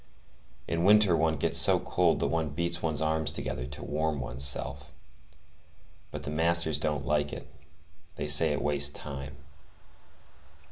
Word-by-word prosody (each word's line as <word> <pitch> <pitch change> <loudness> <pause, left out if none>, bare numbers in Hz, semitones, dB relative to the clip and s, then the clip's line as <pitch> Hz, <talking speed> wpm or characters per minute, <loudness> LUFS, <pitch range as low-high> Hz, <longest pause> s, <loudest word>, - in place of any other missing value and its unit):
In 85 0 -2
winter 105 -2 +4
one 80 0 0
gets 70 - +3
so - - +5
cold - - 0
that - - 0
one 80 -2 -2
beats 85 +3 -2
one's 80 -1 -2
arms 80 -1 0
together 65 -3 -5
to 65 - -8
warm 80 0 -3
one's 60 +1 -3
self; 70 +1 +3 1.2
but - - -8
the 70 - -5
masters 80 0 +1
don't 75 -2 -3
like 75 0 -1
it; - - -9 0.7
they - - -5
say 75 +2 +4
it 75 - -3
wastes 70 -1 +2
time. 70 -3 -9
75 Hz, 150 wpm, -27 LUFS, 70-80 Hz, 1.2 s, so